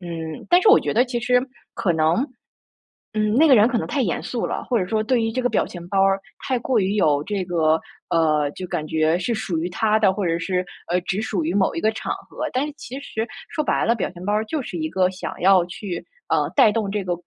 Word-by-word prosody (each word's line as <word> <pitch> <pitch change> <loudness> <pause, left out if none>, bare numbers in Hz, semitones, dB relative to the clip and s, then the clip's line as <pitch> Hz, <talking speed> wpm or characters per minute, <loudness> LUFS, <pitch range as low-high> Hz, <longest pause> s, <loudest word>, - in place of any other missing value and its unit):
嗯， 165 -3 -6
但 355 +1 +6
是 - - +5
我 425 - +8
觉 - - -2
得 240 +3 +4
其 245 -1 -3
实， 250 +1 +3 0.3
可 185 - 0
能， 160 +1 +2 1.0
嗯， 215 0 +1
那 310 +7 +5
个 270 - +7
人 210 -2 +6
可 245 -1 0
能 - - -2
太 285 - 0
严 190 -9 -1
肃 240 - -3
了； - - -2
或 245 - +3
者 185 - 0
说 215 +3 0
对 240 +3 +1
于 225 0 0
这 255 - -1
个 245 - +1
表 - - +1
情 175 -1 -9
包 195 +1 +2
儿 195 0 +3 0.3
太 255 -2 +1
过 245 +1 0
于 195 0 0
有 150 -7 +2
这 200 0 -2
个 160 -3 +2 0.3
呃， 155 -3 +2
就 185 +4 -7
感 165 -3 -3
觉 155 +2 +1
是 210 +6 -1
属 215 -6 -2
于 165 +2 -1
他 215 +4 +2
的， 200 -3 +3
或 195 -2 -1
者 165 0 +1
是， 180 +1 -1 0.3
呃， 180 - +3
只 190 +3 -2
属 195 -6 -1
于 165 +3 -1
某 195 -1 +2
一 165 - -3
个 215 - +3
场 - - -3 0.2
合。 - - -4
但 260 +3 0
是 300 - -8
其 265 -1 -7
实 225 -5 -4 0.2
说 305 - -2
白 - - +1
了， 230 - +3
表 205 - -2
情 180 0 -11
包 205 - 0
儿 215 +1 +1
就 295 +6 -2
是 185 - -6
一 155 -1 -2
个 185 +2 +2
想 185 - -6
要 185 -1 +5
去， 180 0 -6 0.2
呃， - - +1
带 215 - +6
动 210 -3 -1
这 205 -1 -2
个 180 -1 -1
195 Hz, 280 characters per minute, -22 LUFS, 175-230 Hz, 1.0 s, 我